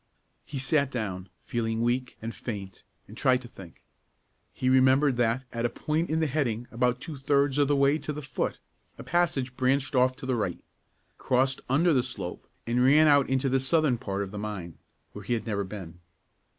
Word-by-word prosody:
He 145 - -7
sat 140 +1 +1
down, 100 -7 -4
feeling 115 -1 -2
weak 125 +1 -1
and 115 +1 -4
faint, 100 -5 -7 0.3
and 105 - -12
tried 130 0 +3
to - - -9
think. 95 -8 -14 0.7
He 130 - -3
remembered 130 +1 +4
that, 120 +2 +1
at 115 0 -2
a 120 - +2
point 155 +7 -2
in 160 +1 +1
the 160 - +2
heading 125 -6 -1
about 125 +1 +1
two 155 +1 -7
thirds 140 +1 +1
of 145 - +4
the 145 - +2
way 140 +2 +3
to 150 - -4
the 150 0 -6
foot, 130 -2 -2 0.4
a - - -8
passage 145 -7 0
branched 135 +2 +1
off 130 0 +3
to 130 - -9
the 130 - 0
right, 105 -7 -2 0.6
crossed 130 +1 +1
under 160 +6 +3
the 130 - +4
slope, 100 -8 -6 0.2
and 120 +2 +1
ran 150 +4 +6
out 145 -2 +4
into 135 +1 +1
the 135 0 +2
southern 135 -2 +2
part 100 -1 -3
of 95 - -7
the 105 - -6
mine, 100 -6 -6 0.3
where 105 - -8
he 110 - -1
had 115 - -2
never 100 -3 -1
been. 95 -4 -8
130 Hz, 200 wpm, -27 LUFS, 115-140 Hz, 0.7 s, ran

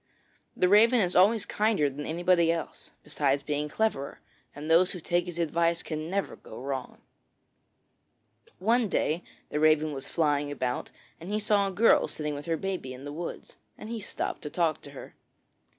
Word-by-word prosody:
The 180 - +4
Raven 225 +5 +6
is 180 -4 +1
always 205 +4 +5
kinder 210 -8 +1
than 145 +1 -5
anybody 170 0 +3
else, 165 -1 -5
besides 140 -1 0
being 150 0 -2
cleverer, 150 -9 -1 0.4
and 145 +2 -7
those 170 +3 +4
who 180 - -6
take 175 +1 0
his 175 -1 -6
advice 170 0 +1
can 155 0 -4
never 200 +2 -2
go 110 - -11
wrong. 135 -1 -5 1.6
One 230 +4 +2
day 160 0 0 0.3
the 150 - -2
Raven 155 0 +3
was 135 -1 -6
flying 145 -3 +1
about, 125 -3 -3 0.3
and 170 +3 -9
he 210 - +1
saw 205 -1 +2
a - - -3
girl 220 +5 +4
sitting 150 -1 -3
with 145 +3 -7
her 165 -1 0
baby 180 -9 -4
in 130 - -11
the 145 - -6
woods, 170 +3 -7 0.2
and 215 - -9
he 230 -1 -4
stopped 205 - -4
to 150 - -5
talk 160 -1 0
to - - -11
her. 140 - -11
165 Hz, 180 wpm, -28 LUFS, 145-190 Hz, 1.6 s, Raven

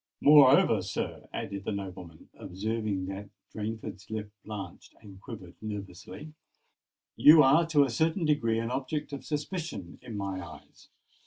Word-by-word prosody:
Moreover, 145 -2 +6
sir," - - -5
added 100 0 -5
the 110 - -3
nobleman, 95 -5 -7
observing 105 0 -3
that 95 +1 -7 0.2
Rainford's 105 -2 -6
lip 110 -1 -5
blanched 100 -5 -8
and 95 -2 -14
quivered 95 -8 -9
nervously, 105 - -8 0.8
"you 155 +1 +8
are 150 +5 +5
to 150 -3 +4
a 135 - 0
certain 160 +7 +1
degree 120 -7 +1
an 115 +1 -2
object 145 +3 -3
of 140 - -6
suspicion 150 - -5
in 110 -3 -7
my 95 -2 -4
eyes. 80 -4 -14
110 Hz, 140 wpm, -29 LUFS, 95-145 Hz, 0.8 s, you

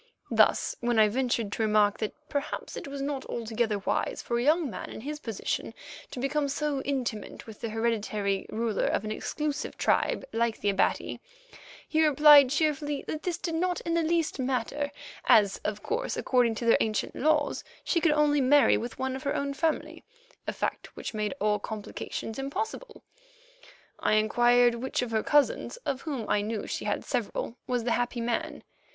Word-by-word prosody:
Thus - - +3
when 240 -1 0
I 215 -1 +6
ventured 235 -3 0
to 225 - -3
remark 210 -1 +3
that 215 - -3
perhaps 285 0 -4
it - - -6
was 275 0 -5
not 280 -1 -2
altogether 225 -2 -1
wise 195 - -1
for 235 0 -1
a - - 0
young 310 +3 +3
man 240 - -6
in - - -8
his 300 +4 -5
position 225 -8 -3 0.3
to - - -7
become 280 +2 0
so 285 -1 -1
intimate 255 -7 -3
with 220 -2 -12
the 230 - -3
hereditary 215 -3 -1
ruler 225 -2 0
of - - 0
an 215 - -3
exclusive 300 +6 -3
tribe - - +1
like 230 0 0
the 205 - +1
Abati, 195 - 0 0.7
he 315 0 +2
replied 295 -2 +8
cheerfully 295 0 0
that 310 - -3
this 355 -2 -2
did 335 - -3
not 355 +2 0
in 335 - -2
the 335 - +3
least 325 -2 0
matter, 265 +3 -1 0.4
as, 200 -2 +5
of 210 0 -3
course, 470 +3 -2
according 245 -3 +2
to 235 - -4
their 230 - +6
ancient 215 -1 -1
laws, 300 0 +1 0.2
she 335 - +1
could 315 -2 +4
only 295 -1 +3
marry 275 +2 +5
with 235 0 -5
one 260 0 -2
of 265 - -6
her 280 - -1
own 280 0 -1
family, 315 +2 -2 0.4
a - - +1
fact - - -4
which - - -5
made 215 +3 -2
all 210 0 +2
complications 220 +2 -6
impossible. 440 - -5 1.0
I - - +1
inquired 240 +3 +4
which 250 +2 -2
of 240 - -5
her 220 -1 +1
cousins, 295 - +2
of 275 -1 -2
whom 275 -9 -4
I 205 - +2
knew 215 +1 -3
she - - -4
had - - -1
several, 235 -1 -2
was 245 -2 0
the 240 - 0
happy 245 0 0
man. 285 +6 -2
255 Hz, 180 wpm, -28 LUFS, 225-295 Hz, 1.0 s, replied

